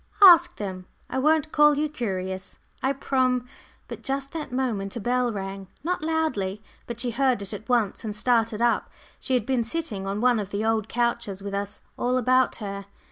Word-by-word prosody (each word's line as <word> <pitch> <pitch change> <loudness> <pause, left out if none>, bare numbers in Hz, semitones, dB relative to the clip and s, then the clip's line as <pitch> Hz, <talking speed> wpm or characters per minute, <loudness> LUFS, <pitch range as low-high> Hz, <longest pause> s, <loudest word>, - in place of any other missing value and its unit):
"Ask 345 -2 +8
them. 185 -3 -6 0.2
I 265 - 0
won't 310 +2 +2
call 295 -1 +5
you 305 +1 +1
curious, 190 -9 -4 0.2
I 265 - +2
prom 255 -2 +1 0.2
" - - -32
But - - -8
just 275 0 -2
that 315 -5 -5
moment 235 -6 -2
a - - -3
bell 245 +2 +1
rang 195 -1 -5 0.2
not 360 +1 -1
loudly, 255 -12 -1 0.2
but 235 -1 -6
she 240 0 -1
heard 255 -3 +1
it 200 - -5
at 210 +4 -8
once, 235 -5 +1
and 215 -2 -4
started 230 0 +1
up. 240 -1 +2 0.3
She 260 - -1
had 240 -4 +1
been 255 -2 +1
sitting 230 -7 -3
on 200 +1 -2
one 245 -1 +3
of 200 -2 -4
the 205 +2 -2
old 220 -1 +1
couches, 235 -4 -1
with 200 0 -5
us 200 0 -4 0.2
all 250 +1 +1
about 255 +1 +3
her. 200 -2 -6
235 Hz, 195 wpm, -25 LUFS, 200-265 Hz, 0.3 s, Ask